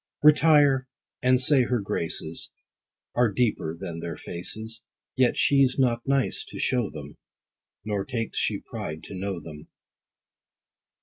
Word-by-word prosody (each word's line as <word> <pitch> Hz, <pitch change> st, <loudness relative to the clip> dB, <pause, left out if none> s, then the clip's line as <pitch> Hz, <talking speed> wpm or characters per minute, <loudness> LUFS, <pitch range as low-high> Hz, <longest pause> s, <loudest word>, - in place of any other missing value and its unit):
Retire, 150 Hz, -3 st, +5 dB, 0.3 s
and 125 Hz, 0 st, +4 dB
say 135 Hz, +1 st, +6 dB
her 125 Hz, 0 st, 0 dB
graces 85 Hz, -4 st, -2 dB, 0.6 s
Are 120 Hz, -3 st, +3 dB
deeper 95 Hz, -7 st, -1 dB
than 85 Hz, -2 st, -6 dB
their 85 Hz, 0 st, -5 dB
faces, 110 Hz, +6 st, -5 dB, 0.3 s
Yet 130 Hz, -2 st, +2 dB
she's 135 Hz, -2 st, +3 dB
not 120 Hz, -3 st, +1 dB
nice 135 Hz, -1 st, +1 dB
to -, -, -10 dB
show 125 Hz, -5 st, 0 dB
them, 75 Hz, -2 st, -10 dB, 0.7 s
Nor 105 Hz, -2 st, -1 dB
takes 115 Hz, -4 st, -3 dB
she -, -, 0 dB
pride 80 Hz, +1 st, -6 dB
to -, -, -9 dB
know 95 Hz, -1 st, -3 dB
them. 75 Hz, -2 st, -11 dB
115 Hz, 130 wpm, -26 LUFS, 85-130 Hz, 0.7 s, say